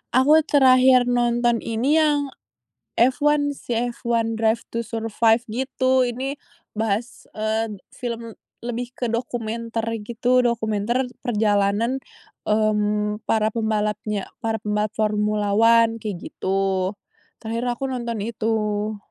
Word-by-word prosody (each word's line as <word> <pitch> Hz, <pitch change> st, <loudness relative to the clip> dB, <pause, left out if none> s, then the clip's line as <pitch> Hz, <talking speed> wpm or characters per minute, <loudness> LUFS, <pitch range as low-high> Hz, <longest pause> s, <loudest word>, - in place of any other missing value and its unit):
Aku 295 Hz, +5 st, +6 dB
terakhir 255 Hz, -2 st, +6 dB
nonton 240 Hz, -1 st, +1 dB
ini, 260 Hz, +8 st, +1 dB
yang 290 Hz, -3 st, +1 dB, 0.6 s
F1 290 Hz, +3 st, +2 dB
sih, 240 Hz, 0 st, -2 dB
Formula 235 Hz, -1 st, 0 dB
1: 225 Hz, 0 st, -3 dB
Drive 225 Hz, +1 st, +1 dB
to 230 Hz, -, -3 dB
Survive, 225 Hz, 0 st, +1 dB
gitu. 260 Hz, +1 st, +1 dB
Ini 260 Hz, +4 st, -3 dB, 0.4 s
bahas, 220 Hz, +2 st, -2 dB
eee, 220 Hz, 0 st, -1 dB, 0.2 s
film 230 Hz, -2 st, -6 dB, 0.2 s
lebih 240 Hz, +1 st, -4 dB
ke 250 Hz, -, -4 dB
dokumenter 230 Hz, -1 st, -3 dB, 0.2 s
gitu, 245 Hz, +2 st, +2 dB
dokumenter 235 Hz, +2 st, 0 dB, 0.2 s
perjalanan, 210 Hz, +2 st, +1 dB, 0.5 s
mmm, 210 Hz, 0 st, +1 dB
para 220 Hz, -1 st, +2 dB
pembalapnya 210 Hz, -2 st, -1 dB
para 225 Hz, -1 st, -1 dB
pembalap 210 Hz, 0 st, -1 dB
Formula 210 Hz, -1 st, 0 dB
1, 230 Hz, 0 st, +5 dB
kayak 210 Hz, -4 st, -5 dB
gitu. 190 Hz, 0 st, -1 dB, 0.5 s
Terakhir, 230 Hz, +2 st, -3 dB
aku 270 Hz, +3 st, -4 dB
nonton 235 Hz, -3 st, -3 dB
itu. 215 Hz, -1 st, -1 dB
230 Hz, 115 wpm, -23 LUFS, 215-245 Hz, 0.6 s, Aku